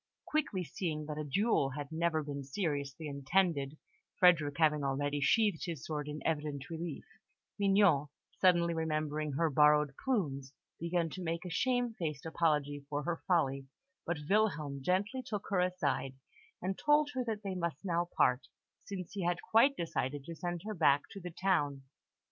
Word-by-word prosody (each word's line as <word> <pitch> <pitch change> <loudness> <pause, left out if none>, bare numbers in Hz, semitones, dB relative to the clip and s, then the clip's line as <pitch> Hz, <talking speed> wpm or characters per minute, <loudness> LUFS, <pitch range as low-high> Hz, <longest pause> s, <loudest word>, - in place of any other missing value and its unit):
Quickly 275 -12 -1
seeing 155 -1 -3
that 150 0 -5
a - - -2
duel 150 - +2
had 145 0 -5
never 160 -1 0
been 140 -1 -5
seriously 145 -1 -3
intended 145 0 0 0.4
Frederick 160 -6 +5
having 150 -3 +3
already 145 +1 -1
sheathed 205 +1 +3
his 165 -6 -5
sword 150 -2 -3
in 150 0 -6
evident 150 -2 -2
relief 165 -2 -5 0.5
Mignon, 195 -7 +4 0.3
suddenly 175 -2 +4
remembering 155 -2 -1
her 160 +3 +1
borrowed 150 0 +5
plumes, 145 - -1 0.3
began 170 -1 0
to 185 - -6
make 165 +1 -3
a 180 - -5
shamefaced 220 - -1
apology 150 -3 0
for 145 0 -2
her 170 +1 -2
folly; 135 -7 +1 0.4
but 170 0 -2
Wilhelm 160 -9 +1
gently 200 - 0
took 210 -5 -4
her 195 - +2
aside, 175 -7 0 0.5
and 190 +1 -2
told 295 0 +3
her 255 -1 -1
that 215 -2 -3
they 195 -1 -3
must 170 -3 -3
now 175 -1 0
part, 125 +1 +3 0.4
since 185 -3 -6
he 200 -3 -3
had 175 0 +1
quite 270 +5 +5
decided 145 -4 -2
to 170 - -6
send 175 +1 -4
her 215 - -3
back 145 -6 +4
to 195 - -8
the 180 - -5
town. 160 -6 0
165 Hz, 160 wpm, -33 LUFS, 145-185 Hz, 0.5 s, Frederick